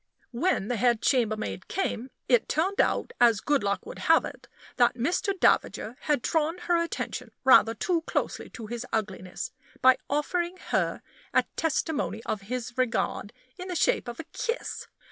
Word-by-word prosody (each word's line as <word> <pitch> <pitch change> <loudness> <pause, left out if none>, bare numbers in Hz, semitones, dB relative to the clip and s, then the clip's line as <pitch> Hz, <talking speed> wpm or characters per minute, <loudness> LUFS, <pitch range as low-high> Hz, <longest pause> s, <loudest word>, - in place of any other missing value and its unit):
When 250 - 0
the 245 - -1
head 240 0 +3
chambermaid 220 -5 0
came, 260 - -2 0.2
it 245 -3 +3
turned 370 +6 +2
out, - - 0
as 230 -4 +6
good 290 +4 +1
luck 200 0 -1
would - - -8
have - - +4
it, - - -9 0.3
that 240 -1 +4
Mr. 365 - 0
Davager 230 -7 +2
had 295 -5 0
drawn 320 +1 +1
her 350 -1 0
attention 335 - -4
rather 230 -3 +6
too 335 - 0
closely - - -2
to 230 - -8
his 240 +2 -5
ugliness, 190 -4 -3 0.3
by 260 0 +6
offering 345 +5 -1
her - - 0 0.3
a - - +6
testimony 305 -7 -1
of 210 - -2
his 245 -1 -4
regard 235 -4 0 0.3
in 365 - -6
the 360 - -4
shape - - +2
of 240 -1 -6
a - - -4
kiss. 465 +2 -3
255 Hz, 165 wpm, -27 LUFS, 230-335 Hz, 0.3 s, as